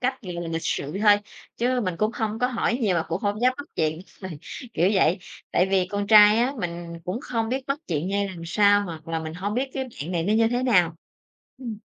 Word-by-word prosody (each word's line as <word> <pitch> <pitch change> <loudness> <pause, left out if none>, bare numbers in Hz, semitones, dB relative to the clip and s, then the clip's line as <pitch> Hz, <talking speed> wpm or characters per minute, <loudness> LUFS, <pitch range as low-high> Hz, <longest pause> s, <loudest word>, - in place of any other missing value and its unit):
cách, 260 0 -1
gọi 180 - -6
là, 170 -1 -4
lịch 165 0 -3
sự 140 - -2
thôi, 210 -1 +8 0.4
chứ 250 +1 +1
mình 185 -6 -2
cũng 215 +5 +1
hông 220 -1 -2
có 250 - +2
hỏi 240 -2 0
nhiều 200 -7 +2
mà 165 - +1
cũng 165 +3 -2
hông 205 +1 -1
dám 250 +1 +4
bắt 285 - -7
chuyện, 155 +1 0 0.2
ời, 185 -6 -7 0.4
kiểu 175 +3 +3
vậy. 190 -1 +3 0.3
Tại 180 - +3
vì 190 -2 +3
con 205 0 -2
trai 210 +1 +8
á, 245 +3 +2
mình 170 -1 -5
cũng 185 +7 -3
không 225 -3 -2
biết 260 +2 -2
bắt 275 +1 -1
chuyện 165 0 -1
ra 200 - -1
làm 175 -3 -9
sao 205 +3 +4
hoặc 160 -3 -8
là 165 0 -1
mình 160 0 -6
hông 200 +3 -3
biết 265 +2 -1
cái 265 -1 -2
bạn 180 - -7
này 170 -2 0
nó 200 - +1
như 225 +1 +4
thế 245 +1 -1
nào. 180 -10 +3 0.6
Ừm. 235 -5 -6
205 Hz, 245 wpm, -25 LUFS, 170-235 Hz, 0.6 s, thôi